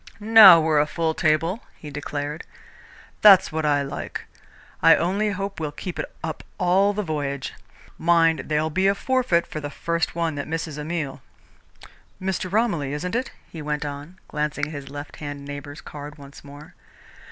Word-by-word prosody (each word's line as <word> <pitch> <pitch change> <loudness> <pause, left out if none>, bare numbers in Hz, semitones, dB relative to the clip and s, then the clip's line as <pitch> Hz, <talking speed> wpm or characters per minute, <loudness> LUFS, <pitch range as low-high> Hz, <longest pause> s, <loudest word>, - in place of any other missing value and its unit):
"Now 210 -5 +9
we're 155 -2 +2
a 150 - +2
full 160 +1 -1
table," 165 +6 +1
he 150 - -10
declared. 145 +1 -4 0.8
"That's 195 -4 +7
what 155 -1 -1
I 145 -1 +2
like. 140 - -6 0.6
I - - +7
only 200 +5 0
hope 195 -1 -4
we'll 155 -2 -3
keep 175 +4 -7
it - - -4
up 160 0 -4
all 190 +3 +3
the 210 +1 -2
voyage. 145 -5 -3 0.5
Mind, 165 -1 +3
there'll 155 +1 0
be 190 +4 +2
a 195 - +3
forfeit 250 -8 +1
for 155 - -6
the 145 -1 -5
first 170 +3 -2
one 165 -2 0
that 145 -1 -5
misses 160 -2 -4
a - - -4
meal. 150 -4 -4 1.0
Mr. 185 -1 -3
Romilly, 180 - 0
isn't 180 +6 -4
it?" 250 +3 -1 0.2
he 160 - -9
went 150 0 -3
on, 145 +5 -7
glancing 150 -1 -2
at 150 - -8
his 140 -2 -7
left 145 +1 -8
hand 145 -1 -7
neighbour's 145 +1 -8
card 145 +1 -9
once 140 -1 -13
more. 145 +1 -13
155 Hz, 175 wpm, -23 LUFS, 145-180 Hz, 1.0 s, Now